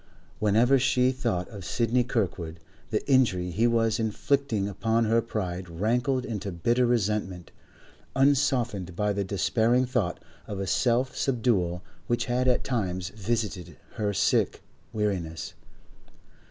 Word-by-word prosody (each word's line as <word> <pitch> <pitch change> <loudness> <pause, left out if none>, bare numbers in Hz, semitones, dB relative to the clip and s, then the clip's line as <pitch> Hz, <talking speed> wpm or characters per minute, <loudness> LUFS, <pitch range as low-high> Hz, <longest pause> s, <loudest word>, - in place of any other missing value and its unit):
Whenever 115 +6 +4
she 125 0 +3
thought 115 -9 -2
of 100 -4 -9
Sidney 120 +7 +1
Kirkwood, 90 -9 -2 0.3
the 105 - -2
injury 105 -10 +3
he 110 +7 +2
was 115 -1 +2
inflicting 110 -1 0
upon 115 +3 0
her 115 +1 +3
pride 95 -5 -4
rankled 120 +9 0
into 105 -3 -4
bitter 120 +8 +1
resentment, 105 -6 -1 0.6
unsoftened 130 - +1
by 105 +1 0
the 100 0 -1
despairing 115 +6 +2
thought 120 -9 -1 0.3
of 100 -2 -4
self 125 +3 +1
subdual 105 -9 0 0.2
which 120 - 0
had 125 +1 0
at 125 - +2
times 95 -7 -2
visited 105 -3 -3
her 105 -2 -1
sick 100 - +1 0.3
weariness. 95 -7 -2
110 Hz, 125 wpm, -27 LUFS, 95-125 Hz, 0.6 s, Whenever